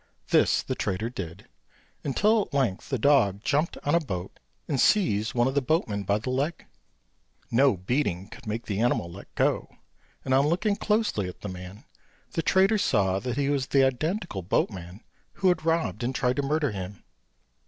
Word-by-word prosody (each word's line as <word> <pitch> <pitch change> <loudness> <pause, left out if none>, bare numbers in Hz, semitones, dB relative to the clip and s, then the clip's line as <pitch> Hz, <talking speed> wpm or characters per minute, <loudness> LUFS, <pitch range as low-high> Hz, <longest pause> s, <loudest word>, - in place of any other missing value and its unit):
This - - +3
the - - -2
trader 105 +5 -2
did, 95 -4 -7 0.6
until 210 - +3
at 170 - -6
length 120 -9 0
the 135 - 0
dog 110 -6 +3
jumped 150 +4 0
on 145 - +1
a 170 - +5
boat 95 - -6 0.3
and 135 - -1
seized 115 - +2
one 120 +1 +3
of 135 - -1
the 140 - +2
boatmen 115 -8 0
by 100 +2 +2
the 110 +4 -4
leg. 140 +6 -2 0.9
No 130 -2 +4
beating 95 -2 -1
could 115 +2 -13
make 110 +2 -3
the 100 -1 -2
animal 110 -7 +1
let 95 +4 -11
go; - - +1 0.6
and 130 - +1
on 135 +2 +4
looking 190 +6 +1
closely 210 - 0
at - - -12
the 105 - -5
man, 90 +4 -9 0.5
the 165 - -1
trader 195 +5 +3
saw 100 - +2
he 130 +5 -1
was 140 -2 0
the 135 -1 +4
identical 155 - -2
boatman 90 +2 -2 0.3
who 190 - +2
had 160 -3 0
robbed 165 -4 0
and 125 +2 -2
tried 125 -1 +1
to - - +2
murder 145 -1 0
him. 95 -1 -7
125 Hz, 180 wpm, -27 LUFS, 100-150 Hz, 0.9 s, a